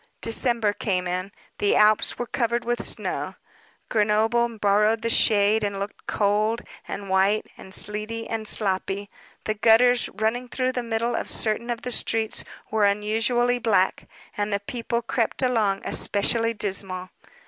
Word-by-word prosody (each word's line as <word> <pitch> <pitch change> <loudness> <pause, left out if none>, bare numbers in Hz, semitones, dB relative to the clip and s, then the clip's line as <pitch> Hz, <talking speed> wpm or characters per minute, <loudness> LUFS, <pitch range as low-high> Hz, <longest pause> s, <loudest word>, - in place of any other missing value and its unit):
December 230 -2 +1
came 185 -4 -1
in. 185 +2 -3 0.3
The 205 - +2
Alps 215 0 +4
were 245 - -3
covered 235 -1 -1
with 240 0 -1
snow; - - -2 0.5
Grenoble 225 +2 +1
borrowed 210 +2 +2
the 230 - +1
shade, 210 0 +4
and 200 -1 -2
looked 200 +1 -7
cold, 215 +3 +1 0.3
and 195 0 -6
white, 195 +3 +2
and 190 - -13
sleety, 215 +3 -3
and 220 -1 -4
sloppy; 200 0 -1 0.3
the 215 - -1
gutters, 235 +3 +4
running 225 +4 -1
through 255 +1 -1
the 250 - -3
middle 230 0 -1
of - - -2
certain 225 +2 -1
of 235 -1 -3
the 250 - -2
streets, 225 -2 0 0.3
were 215 -1 +3
unusually 225 +4 +1
black, 205 -5 +1 0.3
and 205 0 -2
the 200 - 0
people 235 +2 -3
crept 235 +2 -1
along 220 -6 +1
especially 230 +3 +1
dismal. 190 -3 0
220 Hz, 150 wpm, -24 LUFS, 205-235 Hz, 0.5 s, Alps